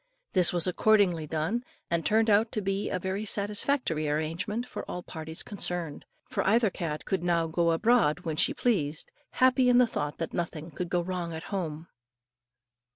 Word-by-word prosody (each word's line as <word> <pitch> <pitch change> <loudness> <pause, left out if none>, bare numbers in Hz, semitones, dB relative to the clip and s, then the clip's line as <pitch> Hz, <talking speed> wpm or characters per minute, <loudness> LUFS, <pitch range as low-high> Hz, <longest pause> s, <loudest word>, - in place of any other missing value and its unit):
This 180 -3 +4
was 175 -2 +1
accordingly 180 -4 +3
done, 160 +11 -1 0.3
and 170 -1 +1
turned 220 +6 +3
out 215 +2 +4
to 215 - -1
be 195 +1 -1
a - - -1
very 190 +3 -3
satisfactory 205 - 0
arrangement 170 +10 -2
for - - -6
all 180 - -5
parties 160 -1 -6
concerned; 175 -6 -3 0.2
for - - -1
either 220 +1 +3
cat 155 -4 -4
could 190 - -1
now 170 -2 +2
go 170 +1 +1
abroad 180 -3 +3
when 160 -3 -3
she 185 +8 +2
pleased, 160 -11 -1 0.2
happy 255 0 +4
in 245 - +5
the 250 - +7
thought 150 -10 -3
that 165 - -4
nothing 165 -1 -4
could 175 +3 -4
go 175 0 +1
wrong 175 -2 -4
at 160 - -6
home. 165 -4 -3
180 Hz, 175 wpm, -28 LUFS, 160-210 Hz, 0.3 s, the